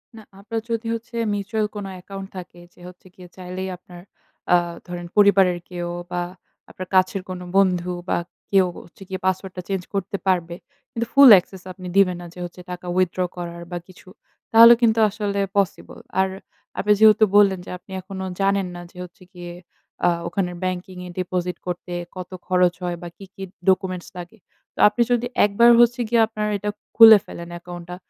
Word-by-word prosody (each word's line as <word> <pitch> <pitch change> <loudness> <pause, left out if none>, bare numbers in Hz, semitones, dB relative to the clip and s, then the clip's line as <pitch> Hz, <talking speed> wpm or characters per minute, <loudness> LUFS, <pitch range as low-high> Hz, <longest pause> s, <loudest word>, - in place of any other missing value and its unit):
না, 220 - -11 0.2
আপনার 220 +3 -4
যদি 230 0 -2
হচ্ছে 230 +1 -7
mutual 225 -2 0
মিউচুয়াল 210 +2 -2
কোন 205 -1 -5
অ্যাকাউন্ট 195 +1 -9
থাকে, 175 -1 -10
যে - - -21
হচ্ছে 180 +1 -15
গিয়ে 180 -1 -13
চাইলেই 185 +1 -6
আপনার 175 -1 -14 0.5
আ 175 - +7 0.3
ধরেন 175 0 -6
পরিবারের 195 -3 +5
কেউ 175 -1 -5 0.2
বা 175 0 -1 0.5
আপনার 185 0 -8
কাছের 185 +1 +2
কোন 185 -1 -5 0.2
বন্ধু 180 -2 +2 0.2
বা - - +1 0.3
কেউ 195 -2 +5 0.2
হচ্ছে 170 - -22
গিয়ে 190 - -4
পাসওয়ার্ডটা 190 -1 -2
চেঞ্জ 190 -2 -2
করতে 200 0 -2
পারবে। 175 -2 0 0.4
কিন্তু 235 0 -3
full 275 -1 +9
access 185 +1 -13
আপনি 185 -1 -10
দিবেন 180 -3 +4
না - - -9
যে - - -12
হচ্ছে 180 +1 -11
টাকা 180 0 -8
withdraw 185 0 +1
করার 170 0 -6
বা, 175 - -3
কিছু। 185 0 -18 0.4
তাহলে 230 +1 +9
কিন্তু 225 -1 +3
আসলে 205 -1 -3 0.2
পসিবল। 195 -3 -2 0.2
আর 190 - +3 0.5
আপনি 210 - +1
যেহেতু 220 0 +6
বললেন 195 -3 +4
যে - - -11
আপনি 185 - -20
এখনো 190 0 -7 0.2
জানেন 195 -1 +1
না 175 - -8
যে, - - -19
হচ্ছে 185 +2 -18
গিয়ে 175 -1 -9 0.5
আ - - +5 0.2
ওখানের 180 -3 -2
ব্যাংকিং 185 0 -4
এর - - -9
ডিপোজিট 180 -1 -2
করতে 175 0 -5 0.2
কত 185 0 -7 0.2
খরচ 180 -1 +3
হয়? 175 -1 -3
বা, 175 - -7
কি, 195 - -11
কি 195 - -8 0.3
ডকুমেন্টস 185 -2 0
লাগে? 175 +5 -9 0.4
তো - - -15
আপনি 215 +3 0
যদি 245 0 +1 0.2
একবার 235 +4 +4
হচ্ছে 240 +1 +3
গিয়ে 235 -1 +4
আপনার 215 -1 -3
এটা 210 +1 -4 0.3
খুলে 225 -1 +10
ফেলেন 170 0 -9
অ্যাকাউন্টটা, 175 0 -9
185 Hz, 180 wpm, -22 LUFS, 180-205 Hz, 0.5 s, খুলে